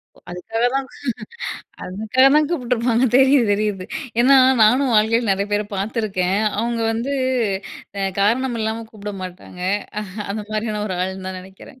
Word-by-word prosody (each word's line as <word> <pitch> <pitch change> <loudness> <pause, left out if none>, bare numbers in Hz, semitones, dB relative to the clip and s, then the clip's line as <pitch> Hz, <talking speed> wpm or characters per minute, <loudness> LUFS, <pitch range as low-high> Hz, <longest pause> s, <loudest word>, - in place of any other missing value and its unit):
ஒ - - -20
அதுக்காக 225 +7 -2
தான் 270 0 0 1.0
அதுக்காக 215 +7 +1
தான் 300 0 +4
கூப்பிட்டுருப்பாங்க 245 -5 +1
தெரியுது, 265 -2 +5
தெரியுது. 205 -2 -1 0.4
ஏன்னா, 270 +2 +6 0.3
நானும் 250 +4 +4
வாழ்க்கையில 220 +1 +3
நெறைய 195 +1 +1
பேர 205 0 +2
பார்த்துருக்கேன்! 195 -2 -1 0.2
அவுங்க 235 +1 -1
வந்து, 235 +5 -2 0.9
அ - - -1 0.2
காரணம் 235 +4 +1
இல்லாம 220 +1 -2
கூப்பிட 210 -1 -7
மாட்டாங்க. 180 0 -9 0.7
அந்த 210 +1 -4
மாரியான 215 -1 -2
ஒரு 185 -3 -3
ஆளுன்னு 190 +1 -3
தான் 190 0 -5
நெனக்கிறேன். 190 +7 -15
220 Hz, 135 wpm, -21 LUFS, 195-240 Hz, 1.0 s, ஏன்னா